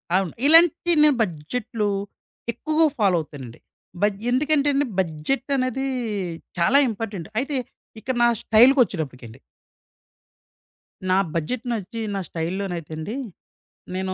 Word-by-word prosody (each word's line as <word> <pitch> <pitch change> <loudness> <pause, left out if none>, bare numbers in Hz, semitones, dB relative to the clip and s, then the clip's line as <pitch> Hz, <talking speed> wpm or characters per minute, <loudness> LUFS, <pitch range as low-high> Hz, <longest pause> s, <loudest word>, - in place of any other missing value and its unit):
అవును. 190 -3 0
ఇలాంటి 330 +2 +6
నేను 300 -2 +5
బడ్జెట్‌లు, 210 +5 -2 0.7
ఎక్కువగా 310 +3 +2
ఫాలో 195 -4 +3
అవుతానండి. 135 -6 -10 0.4
బ - - 0 0.3
ఎందుకంటెండి 285 +1 +2
బడ్జెటనేది, 255 - -1 0.7
చాలా 250 +11 +4
ఇంపార్టెంట్. 200 -6 -5
అయితే 275 +3 -2 0.4
ఇక్కడ 255 +4 -3
నా - - +6 0.2
స్టైల్‌కొచ్చేటప్పటికండి. 175 - +3 1.7
నా 185 - +4 0.2
బడ్జెట్ 220 - -3
నచ్చి. 225 +1 -4
నా - - -1
స్టైల్‍లోనైతే 170 -1 -4
అండి. 195 +9 -5 0.8
నేను 190 0 -2
215 Hz, 100 wpm, -23 LUFS, 170-270 Hz, 1.7 s, ఇలాంటి